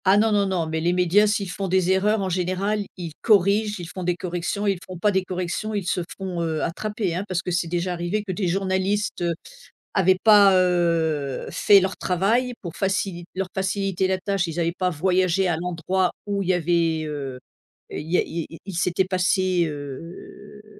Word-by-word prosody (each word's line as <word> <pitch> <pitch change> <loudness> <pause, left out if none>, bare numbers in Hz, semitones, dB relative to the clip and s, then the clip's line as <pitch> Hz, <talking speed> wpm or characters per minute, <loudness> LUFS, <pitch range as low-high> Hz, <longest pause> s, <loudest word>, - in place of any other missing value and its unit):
Ah, 190 +2 +5
non, 220 +1 +3
non, 200 -1 +2
non, 180 -3 0
mais 160 0 -2
les 170 +2 +1
médias 180 +4 +4
s'ils 200 -3 -1
font 195 +1 -3
des 185 0 +2
erreurs 205 +3 +2
en 190 - -1
général, 185 +4 -1
ils 170 -3 -5
corrigent, 205 0 +3
ils 175 - -6
font 185 - -7
des 175 0 +1
corrections, 180 +3 -3
ils 195 -3 +1
font 185 -1 -9
pas 205 +4 +2
des 190 -1 +1
corrections, 185 +4 -3
ils 200 -3 -2
se 180 - 0 0.2
font, 185 -3 -4
heu, 160 -2 -1
attraper, 210 +2 -2
hein, 180 +3 -2
parce 185 -2 -2
que 180 - -3
c'est 175 -1 0
déjà 175 +2 -1
arrivé 175 +5 -2
que 200 - -4
des 185 0 -1
journalistes, 190 +3 0
heu, 170 -1 0 0.6
avaient 190 -1 +4
pas, 205 -3 +7
heu, 165 -6 +1
fait 200 -1 +6
leur 190 0 -1
travail 220 +8 +1
pour 170 -3 -6
facilit 190 -2 -1
leur 190 0 -2
faciliter 190 -1 0
la 190 0 +1
tâche, 195 -1 -1
ils 165 +1 -4
avaient 170 0 +1
pas 180 +1 -1
voyagé 185 +2 +1
à 175 - +1
l'endroit 180 +2 0 0.2
où 200 -1 -1
il 185 - -3
y - - +5
avait, 165 -2 +1
heu 140 -4 -5 0.5
et - - -4
il 160 +2 -9
y 180 - +4
a - - +4
il 165 - -5
y - - -8
a - - -10
il 195 - -6
s'était 180 +2 +1
passé, 185 -1 +1
heu, 165 +8 -9
185 Hz, 210 wpm, -23 LUFS, 170-195 Hz, 0.6 s, pas